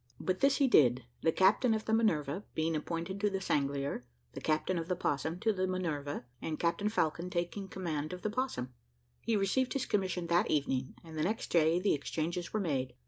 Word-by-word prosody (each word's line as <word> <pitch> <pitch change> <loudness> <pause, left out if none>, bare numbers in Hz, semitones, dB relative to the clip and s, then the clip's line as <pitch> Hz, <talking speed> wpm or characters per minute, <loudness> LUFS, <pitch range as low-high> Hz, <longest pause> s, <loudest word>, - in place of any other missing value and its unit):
But 185 0 -1
this 275 0 +4
he 280 - +4
did, 125 - +5 0.2
the 160 - +3
captain 215 +7 +4
of 220 - -3
the 220 - 0
Minerve, 175 -8 +2
being 160 +1 +1
appointed 170 +5 -3
to 210 - +3
the 195 -1 -2
Sanglier, 140 -6 -1 0.3
the - - -7
captain 155 +3 +1
of 165 - -4
the 180 - 0
Opossum 160 0 -1
to 220 -1 +2
the 185 -1 0
Minerve, 155 -7 -2 0.2
and 155 -1 -3
Captain 170 +5 +1
Falcon 170 -4 0
taking 175 +3 -2
the - - -14
command 160 -5 -3
of 180 0 -7
the 215 - 0
Opossum. 210 - -2 0.5
He 230 - 0
received 210 +6 +1
his 275 -2 -1
commission 185 -3 0
that 170 +1 +2
evening, 135 -3 0
and 160 -2 -7
the - - +2
next 215 +6 -2
day 165 0 +4
the 200 +2 +2
exchanges 165 +4 -2
were 215 - 0
made. 135 -9 -1
175 Hz, 205 wpm, -32 LUFS, 155-200 Hz, 0.5 s, did